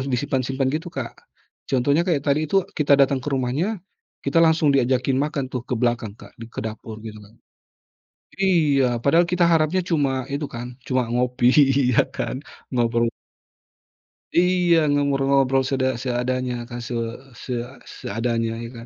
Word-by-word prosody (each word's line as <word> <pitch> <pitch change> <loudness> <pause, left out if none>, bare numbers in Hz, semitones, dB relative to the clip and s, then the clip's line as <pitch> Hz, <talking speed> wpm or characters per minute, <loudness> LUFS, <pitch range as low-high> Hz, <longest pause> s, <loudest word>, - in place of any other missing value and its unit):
disimpan-simpan 130 +1 -1
gitu, 160 +3 -3
Kak. 130 -8 -5 0.6
Contohnya 140 +5 +2
kayak 145 -5 +1
tadi 150 +1 +1
itu 195 +1 +2
kita 145 -2 +3
datang 140 -1 +3
ke 130 - -5
rumahnya 140 - -1 0.5
kita 140 +4 -2
langsung 160 -2 +4
diajakin 130 0 +2
makan 145 -3 -2
tuh 125 - -2
ke 125 - -6
belakang 120 -4 0
Kak 100 - -15
di - - -6
ke - - -6
dapur, 110 0 -7
gitu 110 -1 -8
kan. 105 +3 -19 1.0
Iya 150 -10 +2
padahal 165 +8 +4
kita 180 -1 +3
harapnya 165 +2 +2
cuma 135 -6 0
itu 140 +2 -3
kan 120 +1 -6
cuma 130 -2 +1
ngopi 125 +1 +1 0.5
ya - - +6
kan, 130 - -4 0.3
ngobrol. 115 -1 +1 1.2
Iya 175 -3 +3
ngobrol-ngobrol 135 -2 +2
seda 130 -2 0
seadanya 125 -1 -2
kan 120 0 -8
se 120 - -4 0.4
se 130 - -9 0.3
seadanya 115 +1 -3
ya - - -5
kan. 115 0 -9
130 Hz, 145 wpm, -22 LUFS, 120-150 Hz, 1.2 s, ya